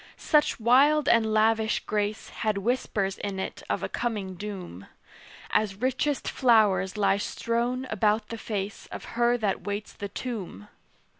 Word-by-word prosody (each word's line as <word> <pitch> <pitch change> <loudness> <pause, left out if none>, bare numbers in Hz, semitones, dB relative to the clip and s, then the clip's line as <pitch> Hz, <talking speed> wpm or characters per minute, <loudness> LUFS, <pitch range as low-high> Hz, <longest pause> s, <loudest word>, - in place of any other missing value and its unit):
Such 300 -4 +2
wild 280 +6 +4
and 225 -4 +4
lavish 220 0 +2
grace 210 0 -2
Had 215 -2 -1
whispers 200 -3 -1
in 200 -2 -4
it - - -5
of - - -1
a - - 0
coming 210 -6 -3
doom; 185 - -7 0.6
As 210 -2 +1
richest 260 +5 -1
flowers 210 -6 +3
lie 195 -1 +3
strown 235 +4 -1
about 215 0 +1
the 230 - -5
face 200 -2 -4
Of - - -8
her 240 0 +4
that 210 -4 -1
waits 205 +1 -4
the 200 - -6
tomb. 195 - -6
215 Hz, 145 wpm, -27 LUFS, 200-235 Hz, 0.6 s, wild